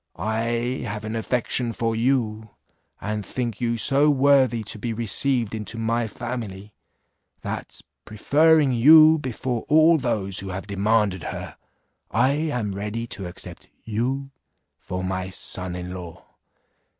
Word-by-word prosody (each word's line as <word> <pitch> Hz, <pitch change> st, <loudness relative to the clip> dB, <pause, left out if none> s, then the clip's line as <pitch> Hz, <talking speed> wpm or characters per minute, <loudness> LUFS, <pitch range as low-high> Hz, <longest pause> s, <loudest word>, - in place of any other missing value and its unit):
I 115 Hz, +3 st, -1 dB
have 105 Hz, +1 st, -5 dB
an 110 Hz, +1 st, -4 dB
affection 115 Hz, +2 st, -1 dB
for 115 Hz, 0 st, -1 dB
you, 110 Hz, -3 st, 0 dB, 0.5 s
and 105 Hz, +1 st, -3 dB
think 120 Hz, +4 st, -4 dB
you 120 Hz, -1 st, 0 dB
so 140 Hz, +6 st, +4 dB
worthy 135 Hz, -5 st, +3 dB
to 105 Hz, +1 st, -5 dB
be 115 Hz, +1 st, -3 dB
received 120 Hz, +1 st, 0 dB
into 110 Hz, +1 st, -4 dB
my 115 Hz, +1 st, 0 dB
family, 110 Hz, -4 st, -6 dB, 0.7 s
that, -, -, -5 dB, 0.2 s
preferring 150 Hz, +6 st, +3 dB
you 155 Hz, +6 st, +7 dB
before 125 Hz, -2 st, -3 dB
all 160 Hz, +2 st, +5 dB
those 105 Hz, -7 st, -1 dB
who 100 Hz, -, -6 dB
have 95 Hz, +1 st, -5 dB
demanded 100 Hz, -1 st, +1 dB
her, -, -, -6 dB, 0.5 s
I 130 Hz, -, +2 dB
am 140 Hz, -9 st, -2 dB
ready 105 Hz, +4 st, -4 dB
to 95 Hz, -3 st, -6 dB
accept 90 Hz, -, -9 dB
you 130 Hz, +5 st, -2 dB, 0.5 s
for 90 Hz, 0 st, -5 dB
my 95 Hz, 0 st, -3 dB
son 95 Hz, -1 st, -5 dB
in 90 Hz, 0 st, -6 dB
law. 90 Hz, -3 st, -9 dB
115 Hz, 135 wpm, -24 LUFS, 105-130 Hz, 0.7 s, you